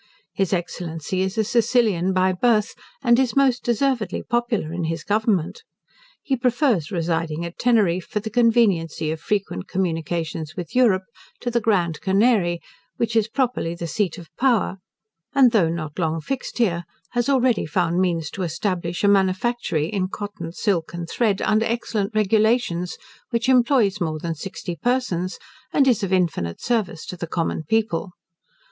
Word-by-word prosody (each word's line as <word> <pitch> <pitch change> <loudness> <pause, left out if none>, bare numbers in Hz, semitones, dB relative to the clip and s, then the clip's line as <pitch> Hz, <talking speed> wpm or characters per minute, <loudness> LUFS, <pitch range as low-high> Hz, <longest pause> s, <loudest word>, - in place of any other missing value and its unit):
His 195 -3 0
Excellency 175 -1 -3
is 190 +3 -2
a 220 - +3
Sicilian 225 -5 +2
by 185 0 +3
birth, 215 +2 +2 0.3
and 240 -1 +5
is 260 -3 +1
most 270 -3 +3
deservedly 240 -4 0
popular 235 -9 -1
in 170 -1 -2
his 165 -1 -3
government. 210 - 0 0.6
He 275 -9 0
prefers 245 - +1
residing 165 -2 -1
at 170 - -8
Teneriffe, 205 -8 +2
for 210 - -1
the 220 +1 -6
conveniency 200 -10 +2
of 160 - -4
frequent 195 - -2
communication 165 -3 -2
with 175 +2 -6
Europe, 215 -7 +4 0.4
to 245 - -2
the 235 0 +1
Grand 175 -8 +1
Canary, 190 -4 +2 0.4
which 230 -1 -1
is 220 -2 +3
properly 235 -9 -1
the 170 - -5
seat 190 +1 -1
of 165 -4 -13
power; 240 -7 +2 0.6
and 265 -3 +6
though 195 -8 +3
not 155 -1 -4
long 165 -1 0
fixed 265 - -4
here, 175 -8 +1 0.3
has 240 +2 0
already 255 - +2
found 175 +2 +1
means 165 -4 0
to 195 - -6
establish 175 0 -2
a - - +5
manufactory 195 - +1
in 185 +1 -1
cotton, 190 -4 -6
silk, 175 -2 -1
and 170 -1 -5
thread, 215 -5 +1
under 215 +1 +2
excellent 225 -3 -2
regulations, 215 -3 +2 0.3
which 235 0 -1
employs 245 -6 +3
more 160 -2 -1
than 165 +1 -3
sixty 175 +1 -6
persons, 185 - -1 0.3
and 275 -2 +3
is 245 -5 +3
of 195 -2 -2
infinite 165 - 0
service 215 -9 -1
to - - -6
the 170 -1 -5
common 165 -1 -1
people. 210 -4 0
195 Hz, 160 wpm, -23 LUFS, 170-235 Hz, 0.6 s, and